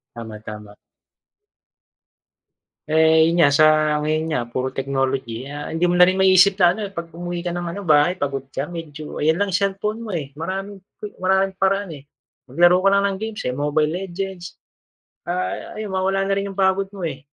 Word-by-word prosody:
Tama, 110 -2 -8
tama. 105 -1 -10 2.1
Eh, 160 +1 +4
yun 170 - 0
nga, 145 - +4
sa 155 +2 +6 0.3
ngayon 155 +1 0
nga 140 - +1
puro 130 +2 -3
technology. 135 -3 -2
Ah, 145 +2 -7
hindi 165 +2 -1
mo 175 0 +2
na 180 - +8
rin 185 - +1
ma-isip 190 0 +5
na 175 -3 +5
ano 210 - -7
kapag 170 -4 -8
umuwi 175 +1 -5
ka 175 - -2
ng 175 0 -4
ano - - -4
bahay 155 +2 +4
pagod 135 -4 -3
ka, 135 +1 -4
medyo 155 -3 -7
ayan 160 +2 +2
lang 200 +1 -1
cellphone 200 +3 -1
mo, 230 -2 -7
eh, 140 -4 -6
maraming 190 +6 -5 0.4
maraming 190 +1 +2
paraan, 195 0 +1
eh. 145 -3 -10 0.5
Maglaro 175 +7 +4
ka 195 - +3
lang 200 0 +3
ng 200 -1 0
games, 220 0 -5
eh, 125 - -1
Mobile 150 +3 0
Legends, 185 0 -6 0.7
ah, 180 +1 -3
ayun 215 -1 -6
mawawala 190 +1 0
na 195 - +2
rin 200 0 -2
yung - - -19
pagod 190 +1 +2
mo, 195 - -9
eh. 140 -4 -5
175 Hz, 185 wpm, -21 LUFS, 145-190 Hz, 2.1 s, na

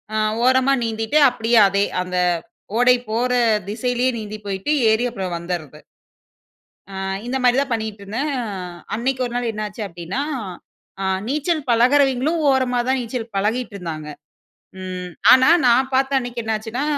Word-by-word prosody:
அ - - +1 0.3
ஓரமா 260 +2 +4
நீந்திட்டு 225 +4 -1
அப்டியே 235 -1 +1
அதே 200 +1 +1 0.2
அந்த 180 0 -4 0.6
ஓடை 245 +1 +5 0.2
போற 240 +3 0 0.4
திசையிலே 245 +4 -1
நீந்தி 215 -1 -6
போய்ட்டு, 195 +7 -2 0.2
ஏறி 220 +2 +2
அப்புறம் 190 -6 -5
வந்துறது. 170 -3 -5 1.1
அ - - -8 0.3
இந்த 255 +2 -2
மாரி 250 0 +4
தான் 275 -3 -2
பண்ணிட்ருந்தேன். 220 +4 -3
அ - - -2 0.5
அன்னைக்கு 255 +4 -1
1 240 - -7
நாள் 245 -1 -1
என்னாச்சு 210 0 -6
அப்டின்னா, 175 +6 -5 0.8
அ - - -1 0.2
நீச்சல் 300 +2 -1
பழகுறவிங்களும் 270 +5 +3
ஓரமா 260 -2 +1
தான் 265 - +2
நீச்சல் 235 -1 -5
பழகிட்டு 215 +3 -1
இருந்தாங்க. 160 -5 -6 0.7
ம். 185 -1 -6 0.2
ஆனா 260 +3 +7 0.2
நான் 255 +2 +4
பார்த்த 270 +1 +2
அன்னைக்கு 245 -1 -5
என்னாச்சுன்னா 220 +4 -3
235 Hz, 140 wpm, -21 LUFS, 205-260 Hz, 1.1 s, ஆனா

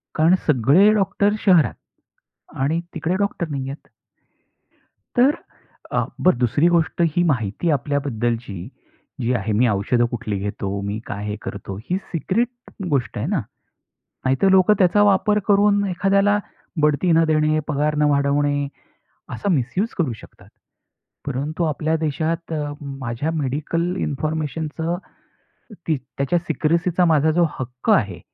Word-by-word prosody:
कारण 165 +4 +5
सगळे 150 - +5
डॉक्टर 200 0 +1
शहरात 170 - +5 0.9
आणि 155 +5 +1
तिकडे 165 +2 -1
डॉक्टर 200 -4 -1
नाहीयेत. 135 0 -6 1.2
तर 265 +4 +4 0.5
अ, - - +1 0.2
बरं 180 -9 +4
दुसरी 130 +7 +3
गोष्ट 170 0 +1
ही 175 - +3
माहिती 125 - 0
आपल्याबद्दलची 120 -6 -1 0.7
जी 120 +1 +1
आहे. 115 -3 -1
मी 120 +4 +3
औषध 110 +4 +1
कुठली 105 -4 -3
घेतो. 100 0 -4
मी 100 +1 -3
काय 105 0 -5
हे 105 0 -3
करतो. 100 -1 -6
ही 180 - +1
सिक्रेट 195 +8 0 0.4
गोष्ट 135 -5 -1
आहे - - -2
ना. - - 0 0.9
नाहीतर 135 +9 +3
लोकं 190 +2 +5
त्याचा 195 +2 +4
वापर 205 +1 +3
करून 205 0 +4
एखाद्याला 195 +2 +2 0.4
बढती 150 +4 +2
न 165 0 +5
देणे, 155 0 +2
पगार 150 +1 0
न - - +2
वाढवणे 145 0 +1 0.7
असा 120 - -3
मिसयूज 175 - 0
करू 145 -8 +1
शकतात. - - -16 0.8
परंतु 145 +5 -2
आपल्या 155 +1 0
देशात 160 +2 -2
अ, 150 -2 -2
माझ्या 135 +1 -4
मेडिकल 160 +6 -1
इन्फॉर्मेशनचं 155 +2 -2 0.9
ती 160 - +2 0.2
त्याच्या 140 +5 +1
सिक्रेसीचा 170 +1 +1
माझा 160 -2 +3
जो 170 +1 +3
हक्क 125 -1 -3
आहे. 95 -4 0
155 Hz, 130 wpm, -21 LUFS, 130-175 Hz, 1.2 s, कारण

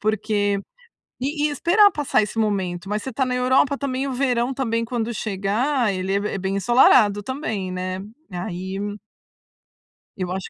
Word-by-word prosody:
Porque 205 -1 0 0.6
e 290 +3 0
esperar 365 +8 +4
passar 295 - +1
esse 210 +2 -4
momento. 195 -4 -1
Mas 210 +1 -1
você 265 - -5
está 265 +2 0
na 255 - -2
Europa 260 +3 +3
também, 275 -1 -2
o 270 - -3
verão 250 -1 0
também 230 -3 -1
quando 235 -1 -2
chegar, 215 +5 0
ele 185 +1 -2
é 200 - +2
be 200 -1 -3
bem 190 +1 -2
ensolarado 205 -1 +5
também, 220 -8 -3
né. 185 +1 -3 0.3
Aí 185 +2 -4 1.4
Eu 185 -2 -3
acho 190 0 -4
220 Hz, 155 wpm, -22 LUFS, 195-260 Hz, 1.4 s, ensolarado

